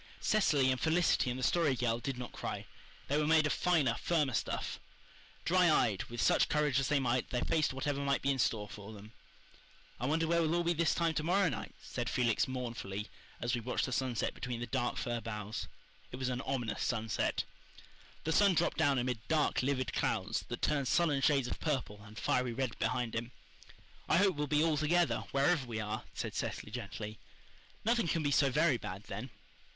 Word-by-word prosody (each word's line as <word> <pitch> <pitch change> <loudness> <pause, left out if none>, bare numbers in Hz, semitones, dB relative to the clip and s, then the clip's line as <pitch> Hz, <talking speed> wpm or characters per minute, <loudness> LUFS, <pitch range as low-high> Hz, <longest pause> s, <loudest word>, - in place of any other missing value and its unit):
Cecily 145 -11 +3
and 130 - -2
Felicity 160 -5 +3
and 125 - -2
the 130 - -4
Story 160 -4 +3
Girl 115 -2 0
did 130 +2 -4
not 125 -1 -6
cry. - - -5 0.4
They 145 +2 +1
were 150 - +1
made 160 -1 +5
of 155 - +1
finer, 155 -9 +2
firmer 150 -6 +1
stuff. - - -2 0.7
Dry 180 0 +4
eyed, 115 -10 +2
with 120 0 -8
such - - +3
courage 150 -3 +2
as 135 - 0
they 150 -2 +2
might, 125 -1 0
they 125 - -1
faced 160 -2 +1
whatever 140 +2 -2
might 140 -1 0
be 140 - +3
in 135 - -1
store 105 -3 +1
for 105 +1 -9
them. 105 +1 -12 0.9
"I 125 - -1
wonder 160 +3 +2
where 170 +1 +2
we'll 160 +1 +1
all 175 - +1
be 170 0 +2
this 165 -1 +2
time 170 -1 +1
to 150 - -1
morrow 185 +2 +3
night," 125 - -6
said - - -3
Felix 120 -3 +2
mournfully, 115 -5 -4 0.3
as 120 +1 -1
we 120 - 0
watched 125 +3 -1
the 130 - -5
sunset 125 -2 -1
between 125 -2 -4
the 120 - -3
dark 120 0 -1
fir 120 -2 -2
boughs. 105 -2 -5 0.4
It - - -5
was 130 0 -2
an 125 0 -2
ominous 120 -5 -2
sunset. 110 -3 0 0.8
The 160 - -1
sun 200 +2 +5
dropped 170 - +1
down 145 -4 +3
amid 125 -2 -1
dark, 155 -2 +2
livid 130 -1 -1
clouds, 105 +4 -1
that 120 - -6
turned 140 -3 +1
sullen 150 -2 +2
shades 135 -3 +3
of - - -4
purple 130 -9 -2
and 110 +1 -13
fiery 125 0 0
red 130 -2 -3
behind 120 0 -1
him. 115 +1 -4 0.8
"I - - +5
hope 195 -1 +4
we'll 150 0 -2
be 150 +2 +3
all 160 -2 +2
together, 155 -4 +2
wherever 140 0 +2
we 115 -2 -3
are," 110 0 -4
said - - -4
Cecily 105 - -4
gently. 110 -2 -6 0.7
"Nothing 230 -4 +2
can 165 -1 0
be 145 - +1
so 140 -1 +4
very 125 - +3
bad - - -7
then." - - -6
130 Hz, 205 wpm, -33 LUFS, 120-155 Hz, 0.9 s, made